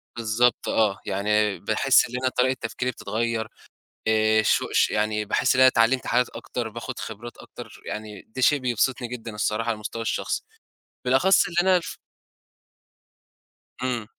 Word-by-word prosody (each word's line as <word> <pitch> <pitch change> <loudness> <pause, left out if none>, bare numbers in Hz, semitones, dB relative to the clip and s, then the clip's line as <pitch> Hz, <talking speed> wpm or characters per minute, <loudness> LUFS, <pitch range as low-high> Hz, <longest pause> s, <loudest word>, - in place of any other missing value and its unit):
بالضبط، 115 +1 +1
آه، 105 -3 +1
يعني 105 +1 0
باحِس 130 +4 +3
إن 125 - -7
أنا 130 - +2
طريقة 130 +1 +1
تفكيري 125 +2 -2
بتتغيّر، 115 -1 -2 0.6
آآ، 110 0 +3
ش - - +2
ش - - +3
يعني 105 0 0
باحِس 120 +5 +1
إن 130 - +2
أنا 130 - +8
اتعلّمت 125 +1 +2
حاجات 125 +1 +2
أكتر 120 -2 -5
باخد 115 +3 -7
خبرات 115 +2 -8
أكتر، - - -12
يعني 105 -1 -6
دي 130 +4 -6
شيء 145 +4 +4
بيبسطني 125 0 0
جدًا 115 -2 -7
الصراحة 105 +2 -1
على 115 - +1
المستوى 110 +2 -6
الشخصي، 115 - -2 0.6
بالأخص 135 +10 +4
اللي 170 -1 -7
أنا 180 - +5
ف 165 - -7 1.9
امم. 125 -3 -2
115 Hz, 150 wpm, -24 LUFS, 110-125 Hz, 1.9 s, أنا